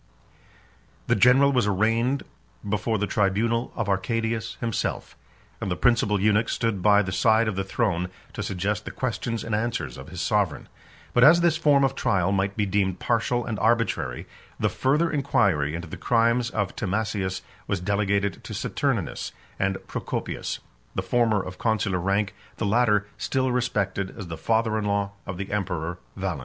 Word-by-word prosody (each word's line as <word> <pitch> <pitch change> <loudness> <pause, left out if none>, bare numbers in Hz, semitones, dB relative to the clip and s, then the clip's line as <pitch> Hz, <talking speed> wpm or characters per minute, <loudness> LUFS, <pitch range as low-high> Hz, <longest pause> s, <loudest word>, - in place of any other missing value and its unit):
The - - +2
general 135 +3 +5
was 125 -6 +2
arraigned 115 +7 +1 0.4
before 110 +2 0
the 105 - 0
tribunal 110 +5 +1
of 115 -3 -2
Arcadius 110 +3 -1
himself; 115 -2 -3 0.5
and - - -2
the 90 - 0
principal 110 -3 +2
eunuch 105 +3 +3
stood 115 -5 -1
by 105 +1 +5
the 95 - -4
side 110 +4 +3
of 110 - -1
the 95 - -1
throne 95 -3 -1 0.2
to - - -4
suggest 100 +3 -2
the - - -4
questions 115 -2 -3
and 115 - -4
answers 110 - -2
of 65 - -10
his 90 - -7
sovereign. 100 -5 0 0.5
But 120 - +5
as 170 +5 +8
this 170 -2 +3
form 145 -3 +4
of 135 0 +2
trial 95 -7 +1
might 100 +1 0
be 105 - +2
deemed 95 -2 0
partial 120 +2 0
and 110 -4 -3
arbitrary, 110 - +1 0.3
the - - +2
further 150 +6 +1
inquiry 100 - +1
into 85 +1 -5
the - - -7
crimes 115 +1 +2
of 105 -4 -2
Timasius 100 -2 -2 0.2
was 100 - 0
delegated 100 0 0
to - - -7
Saturninus - - -2 0.3
and 95 0 +1
Procopius; - - -4 0.3
the - - -1
former 115 -4 +2
of 90 0 -8
consular 110 -5 +1
rank, 100 +2 0 0.2
the 110 - -1
latter 105 -1 +3
still 130 -1 0
respected 100 -6 -1
as 100 -6 -7
the 80 - -4
father 110 +2 +1
in 105 - -3
law 100 -1 0 0.2
of 95 -2 -4
the 95 +1 -5
emperor 90 -4 -2 0.2
Valens. 95 -6 -3
105 Hz, 170 wpm, -25 LUFS, 95-115 Hz, 0.5 s, as